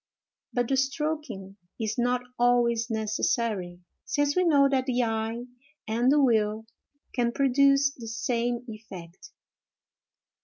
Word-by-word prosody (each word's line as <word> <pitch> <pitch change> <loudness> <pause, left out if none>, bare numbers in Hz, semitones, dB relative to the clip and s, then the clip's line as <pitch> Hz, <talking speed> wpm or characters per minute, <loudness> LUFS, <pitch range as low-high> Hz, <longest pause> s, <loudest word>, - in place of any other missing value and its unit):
But 245 -2 0
the 270 - +1
stroking 270 -8 -3 0.2
is 220 +1 -2
not 245 +1 +1 0.2
always 240 -1 +2
necessary, 215 -4 -1 0.2
since 290 0 0
we 365 - +3
know 285 -5 +5
that 265 -1 0
the 250 -1 +1
eye 225 +1 -2 0.4
and 235 +4 +2
the 295 - +4
will 220 -4 +2 0.5
can 240 -1 +1
produce 275 +2 +3
the 235 -4 -10
same 235 +1 -2
effect. 195 -6 -10
240 Hz, 120 wpm, -27 LUFS, 220-270 Hz, 0.5 s, know